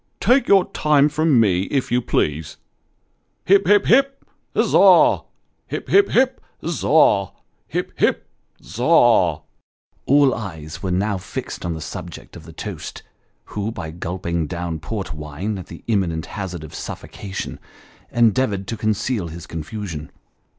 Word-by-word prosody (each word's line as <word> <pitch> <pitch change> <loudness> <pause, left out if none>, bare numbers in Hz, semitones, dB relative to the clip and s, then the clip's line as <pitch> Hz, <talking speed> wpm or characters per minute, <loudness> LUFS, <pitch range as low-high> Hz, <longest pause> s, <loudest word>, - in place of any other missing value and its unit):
Take 260 +2 +3
your 195 -2 +5
time 150 -1 +3
from 150 -3 +3
me, 95 -4 +2
if 135 0 -2
you 125 +1 +2
please. 75 - -1 0.9
Hip! 195 0 +4
hip! 205 0 +5
hip! 275 +3 +3 0.3
Za! - - +6 0.5
Hip! - - -5
hip! 400 0 +5
hip! 260 +1 +2 0.3
Za! 150 - +3 0.4
Hip! - - -3
hip! - - +1 0.4
Za 100 +7 -8
a 120 - +5
a! 75 - -19 0.3
" - - -44
All 140 -1 +5
eyes 80 -6 -7
were 95 - -3
now 95 +2 0
fixed - - -6
on 85 -1 -2
the 80 - -7
subject 85 +2 -8
of 80 -3 -11
the 80 - -11
toast, 80 - -7 0.5
who 105 +2 -2
by 80 -7 -6
gulping 85 -1 -3
down 85 -2 -4
port 95 +3 -5
wine 75 +7 -5
at 90 - -9
the - - -11
imminent 90 -8 0
hazard 90 -5 -6
of 80 +1 -10
suffocation, 95 +3 -7 0.5
endeavoured 110 -3 +2
to 115 - -3
conceal 110 -2 -1
his 85 +1 -9
confusion. 80 -1 -6
100 Hz, 145 wpm, -21 LUFS, 85-130 Hz, 0.9 s, Za